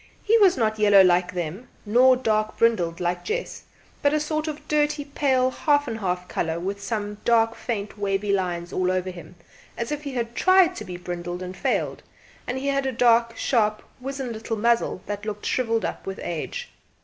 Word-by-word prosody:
He 440 - +3
was 380 -6 +5
not 220 -2 0
yellow 205 -2 +7
like 180 -1 +3
them, 180 +6 -5 0.2
nor 250 +4 +5
dark 215 -3 0
brindled 175 -8 +2
like 175 0 -1
Jess, 480 +3 -4 0.4
but 290 0 +3
a - - +2
sort 310 +1 -2
of 305 -1 -6
dirty 295 -1 +1
pale 265 -3 +1
half 290 +1 +2
and¬ 225 -2 -4
half 180 -2 -2
colour 165 -1 -2
with 195 +3 -4
some 205 0 -3
dark 225 -1 +3
faint 210 -3 -5
wavy 200 0 0
lines 175 -3 -2
all 185 0 +1
over 185 0 -1
him, 180 0 -12 0.4
as 235 +3 -3
if 295 -1 -2
he 280 -2 -6
had 235 -2 -3
tried 370 +3 +4
to - - -6
be 180 -1 -6
brindled 175 0 -5
and 185 +1 -7
failed; 190 - -1 0.5
and 250 - -2
he 275 +1 -2
had 275 -1 0
a - - 0
dark 230 -1 +3
sharp 215 -4 +1 0.2
wizened 265 -1 -4
little 225 +1 -4
muzzle 235 -3 +1
that 205 0 -5
looked 210 -1 -5
shrivelled 230 -3 0
up - - -5
with 195 - -5
age. 175 - -5
225 Hz, 195 wpm, -24 LUFS, 185-265 Hz, 0.5 s, yellow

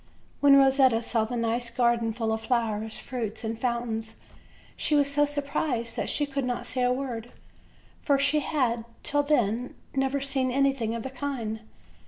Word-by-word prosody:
When 285 -1 +7
Rosetta 265 -3 +5
saw 225 -1 +1
the 245 - -4
nice 235 +1 0
garden 235 -1 +1
full 225 0 -2
of 220 - -2
flowers, 220 -2 -1
fruits 235 -4 -5
and 225 0 -2
fountains 230 -2 -2 0.6
she 300 - +1
was 285 -1 +3
so 290 0 +3
surprised 280 -5 -2
that - - -2
she 295 - +1
could 275 -1 -3
not 245 -1 -2
say 255 +1 -1
a 250 0 +3
word; 250 -3 -3 0.7
for 280 -2 +3
she 285 +2 +3
had, 250 -6 0 0.2
till 290 0 +2
then, 250 -5 0 0.2
never 270 +1 0
seen 270 -1 0
any 275 +2 +3
thing 230 -4 -3
of 230 - -4
the 265 - -5
kind. 250 -5 -3
250 Hz, 175 wpm, -27 LUFS, 230-275 Hz, 0.7 s, When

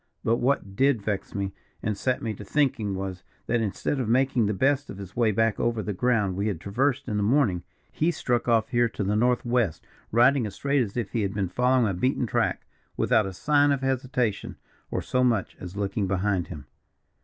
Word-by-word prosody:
But 115 +1 +2
what 120 -7 0
did 135 -3 +2
vex 100 -2 -3
me, 100 -1 -2 0.3
and 105 -1 0
set 130 +5 -1
me 110 -2 -2
to 105 - -9
thinking, 110 -5 0
was, 95 -1 -5 0.2
that 120 0 +1
instead 110 +6 -2
of 120 -4 -1
making 130 -2 +2
the 105 - 0
best 140 +5 +1
of 100 - -7
his 95 -1 -9
way 120 -2 +3
back 115 +1 +1
over 115 -2 0
the 105 - -3
ground 105 -3 +1
we 100 +3 -1
had 100 -7 -2
traversed 130 +8 0
in 105 -3 -1
the - - +1
morning, 105 -5 +2 0.3
he 160 - +1
struck 125 -8 -1
off 115 -2 +3
here 120 -2 +2
to 105 - -4
the 100 +2 0
north 120 +3 +2
west, 120 -8 0 0.3
riding 120 +1 +4
as 100 - -9
straight 140 -1 +1
as 110 -1 -3
if 115 -5 -2
he 115 - 0
had 100 0 -2
been 95 -3 -1
following 125 +4 +2
a 100 - 0
beaten 125 +7 0
track, - - -1 0.3
without 110 -3 +3
a - - -4
sign 145 +9 +3
of 140 -1 0
hesitation, 130 -4 -1 0.3
or - - -2
so 125 0 +1
much 115 -6 +1
as 90 +2 -8
looking 100 0 -1
behind 95 -1 0
him." 75 -6 -8
115 Hz, 215 wpm, -26 LUFS, 100-125 Hz, 0.3 s, riding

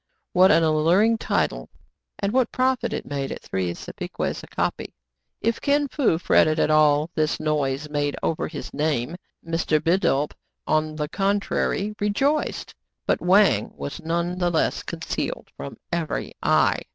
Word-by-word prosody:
What 185 +1 +6
an 165 -4 +5
alluring 170 +9 +3
title! - - -1 0.5
and 200 +1 -2
what 255 -1 +2
profit 255 0 +1
it - - -4
made 140 -1 -3
at - - -7
three 95 -2 -2
sapeques - - -5
a - - -12
copy! - - -3 0.5
If 230 +1 0
Kin 290 0 +2
Fo 255 - +2
fretted 155 -2 +3
at - - +2
all 155 +1 +4
this 155 -1 0
noise 150 -2 -1
made 145 -1 -1
over 160 - -1
his 150 -3 -8
name, 150 -1 -1 0.3
Mr. 165 -2 +1
Bidulph, 150 -4 +1 0.3
on 155 0 0
the 150 -1 -2
contrary, 200 +2 0
rejoiced; 270 +9 0 0.3
but - - +1
Wang 195 +3 +4
was 145 - -6
none 170 +2 -1
the 175 -1 +2
less 165 -2 0
concealed - - -4
from 70 +1 -8
every 170 -2 -2
eye. - - +3
165 Hz, 150 wpm, -24 LUFS, 150-200 Hz, 0.5 s, What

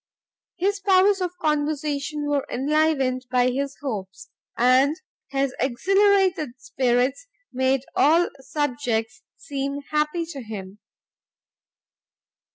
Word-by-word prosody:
His 400 +3 0
powers 390 0 +4
of 360 0 -3
conversation 295 -1 -1
were 290 -2 0
enlivened 270 -2 +1
by 250 0 +3
his 275 +2 -3
hopes; 195 -8 -6 0.3
and 260 +6 +4 0.3
his 275 -1 0
exhilarated 375 +1 +2
spirits 260 - 0 0.3
made 260 +1 +1
all 330 +4 +4
subjects 245 -5 -2 0.2
seem 280 0 -4
happy 300 +3 0
to 280 -5 -6
him. 205 -3 -8
280 Hz, 95 wpm, -24 LUFS, 255-315 Hz, 0.3 s, powers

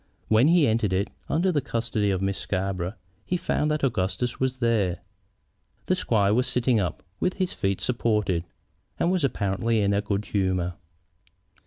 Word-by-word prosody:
When 110 +5 +5
he 170 -2 +5
entered 110 -3 +1
it, 95 +3 0 0.2
under 180 +4 +2
the 150 -4 +1
custody 115 -5 -1
of 95 -1 0
Miss 95 0 -1
Scarborough, 95 0 -2 0.3
he 180 - -1
found 155 -3 0
that 150 -1 -1
Augustus 120 0 -1
was 130 0 0
there. 115 -7 +1 0.9
The - - +2
squire 105 - +2
was 125 +3 +2
sitting 125 -2 +2
up, 90 -5 -2 0.2
with 185 - 0
his 185 -2 -1
feet 95 -1 -1
supported, 105 -8 0 0.6
and 175 - +2
was 185 -4 +1
apparently 115 -2 0
in 100 -1 +2
a 100 - +2
good 100 0 -2
humor. 95 -3 0
110 Hz, 165 wpm, -26 LUFS, 95-130 Hz, 0.9 s, When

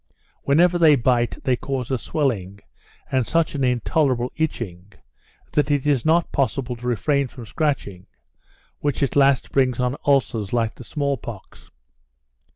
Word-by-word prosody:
Wherever 175 +5 +3
they 155 -3 +6
bite 120 -1 +1
they 130 - +2
cause 130 0 -4
a 130 - +1
swelling, 100 - -2 0.5
and 130 -3 +1
such 165 -1 +1
an 140 -2 -2
intolerable 125 0 +1
itching, 100 - -4 0.6
that 150 -1 +1
it 145 -2 +1
is 140 -5 +1
not 165 +2 +2
possible 130 -2 -1
to 120 +1 -7
refrain 140 +4 +1
from 125 -1 -11
scratching, 120 - -2 0.7
which 145 -1 -1
at 135 - -1
last 140 -1 +3
brings 130 -3 +1
on 125 +1 0
ulcers 120 -7 +1
like 115 -2 +1
the - - -12
small 140 +1 -2
pox. 110 -4 -11
130 Hz, 150 wpm, -22 LUFS, 120-145 Hz, 0.7 s, they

